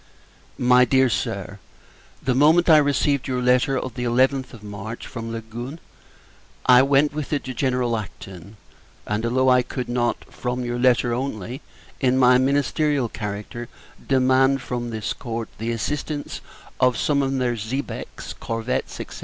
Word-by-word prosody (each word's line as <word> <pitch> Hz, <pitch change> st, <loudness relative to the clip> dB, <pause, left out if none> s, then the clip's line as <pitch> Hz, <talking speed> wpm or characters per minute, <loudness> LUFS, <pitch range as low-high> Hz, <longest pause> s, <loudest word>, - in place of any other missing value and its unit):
MY 125 Hz, 0 st, +5 dB
DEAR 130 Hz, 0 st, +3 dB
SIR, -, -, -3 dB, 0.6 s
The 130 Hz, -, +1 dB
moment 160 Hz, +6 st, +5 dB
I 155 Hz, -, +9 dB
received 145 Hz, -1 st, +2 dB
your 130 Hz, -1 st, -1 dB
letter 125 Hz, +2 st, +2 dB
of 130 Hz, 0 st, -4 dB
the 125 Hz, -, -4 dB
11th 130 Hz, +2 st, +2 dB
of 110 Hz, -3 st, -12 dB
March 105 Hz, +2 st, -7 dB
from 115 Hz, -1 st, -6 dB
Leghorn, 115 Hz, +6 st, -6 dB, 0.9 s
I 125 Hz, 0 st, +7 dB
went 140 Hz, +2 st, +3 dB
with 150 Hz, -2 st, -4 dB
it 145 Hz, -, 0 dB
to 130 Hz, -, -5 dB
General 125 Hz, -2 st, 0 dB
Acton: 95 Hz, -1 st, -8 dB, 0.5 s
and, 105 Hz, +1 st, -2 dB
although 130 Hz, +2 st, +2 dB
I 125 Hz, 0 st, +5 dB
could 125 Hz, 0 st, -5 dB
not, 120 Hz, -1 st, -1 dB
from 125 Hz, 0 st, -3 dB
your 120 Hz, 0 st, -2 dB
letter 120 Hz, -1 st, +3 dB
only, 125 Hz, -1 st, -4 dB, 0.4 s
in 130 Hz, -1 st, +2 dB
my 125 Hz, -1 st, +6 dB
Ministerial 140 Hz, 0 st, +1 dB
character, 105 Hz, +3 st, -6 dB, 0.4 s
demand 130 Hz, 0 st, +3 dB
from 120 Hz, -1 st, -3 dB
this 110 Hz, -2 st, -3 dB
Court 115 Hz, -1 st, -5 dB
the 115 Hz, +1 st, -3 dB
assistance 145 Hz, +5 st, -3 dB, 0.4 s
of 125 Hz, -1 st, +3 dB
some 145 Hz, -2 st, +1 dB
of 135 Hz, 0 st, 0 dB
their 125 Hz, -2 st, 0 dB
xebecs, 115 Hz, +6 st, -5 dB
corvettes, 115 Hz, +2 st, -3 dB
&c. -, -, -5 dB
125 Hz, 155 wpm, -23 LUFS, 115-135 Hz, 0.9 s, I